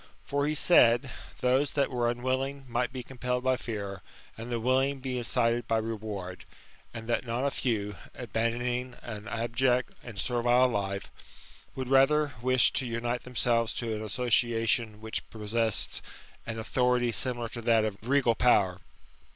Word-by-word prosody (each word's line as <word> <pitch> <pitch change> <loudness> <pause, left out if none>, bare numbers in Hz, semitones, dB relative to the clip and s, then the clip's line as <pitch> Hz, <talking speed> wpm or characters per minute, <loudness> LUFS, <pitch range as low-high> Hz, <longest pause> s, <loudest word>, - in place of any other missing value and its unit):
" - - -33
For 140 +1 +1
he 155 - 0
said, 125 -5 +5 0.3
those 130 +3 +2
that 140 -2 +1
were 120 -2 +1
unwilling 130 +3 -2
might 120 +1 -1
be 130 -1 -6
compelled 125 0 -3
by 130 0 +3
fear, 100 -6 -5 0.3
and 115 +2 -7
the 120 - 0
willing 130 +4 +2
might 135 - -13
be 130 -2 -2
incited 120 -1 +1
by 115 - +2
reward; 105 -5 -5 0.5
and 115 0 -8
that 120 - 0
not 120 +2 -2
a 140 - +1
few, 105 -6 -1 0.2
abandoning 120 +2 -2
an 110 -2 -7
abject 120 +2 0
and 115 -4 -9
servile 125 +3 +3
life, 100 -3 -3 0.6
would 130 -1 -4
rather 140 +3 +4
wish 130 0 +4
to 130 - 0
unite 120 +1 -2
themselves 115 -2 +1
to 115 -2 -3
an 110 0 -4
association 115 -1 +1
which 110 0 -4
possessed 110 0 0 0.5
an 115 0 -3
authority 125 +1 +1
similar 120 0 -1
to 120 - -7
that 115 -1 +3
of 105 -2 -3
regal 125 0 +3
power. 100 -6 +3
120 Hz, 160 wpm, -29 LUFS, 115-125 Hz, 0.6 s, said